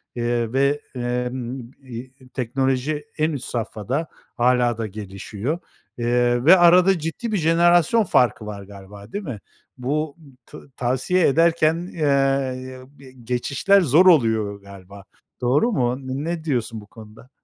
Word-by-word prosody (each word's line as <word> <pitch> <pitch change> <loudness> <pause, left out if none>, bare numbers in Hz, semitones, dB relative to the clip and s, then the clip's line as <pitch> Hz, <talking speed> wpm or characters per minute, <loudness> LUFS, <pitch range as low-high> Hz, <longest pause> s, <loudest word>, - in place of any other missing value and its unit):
eee, 120 -1 -1
ve, 140 +2 +1
emm, 125 0 -4
iii, 125 +1 -9 0.2
teknoloji, 135 - -1
en 155 +1 +1
üst 140 -4 -5
safhada 120 +6 -3 0.3
hâlâ 120 -1 +2
da 115 -1 -3
gelişiyor, 105 - -5 0.4
eee, 120 +1 +1
ve 185 +3 +8
arada 175 +1 +5
ciddi 165 +9 -4
bir 210 - +1
jenerasyon 175 +5 +3
farkı 120 - +2
var 100 -1 -7
galiba, 100 +1 -13
değil 205 0 -4
mi? 130 - -6 0.4
Bu, 145 +4 -2 0.3
ta - - -12 0.2
tavsiye 130 +9 +1
ederken, 165 +3 +2
eee, 135 -3 0 0.2
be 130 -2 -14
geçişler 140 - +2
zor 160 +4 +4
oluyor 110 - +3
galiba. 100 0 -13 0.4
Doğru 140 - +2
mu? 125 - 0
Ne 150 +6 -4
diyorsun 115 -7 -2
bu 105 - -16
konuda? 110 +3 -15
130 Hz, 130 wpm, -22 LUFS, 120-155 Hz, 0.4 s, ve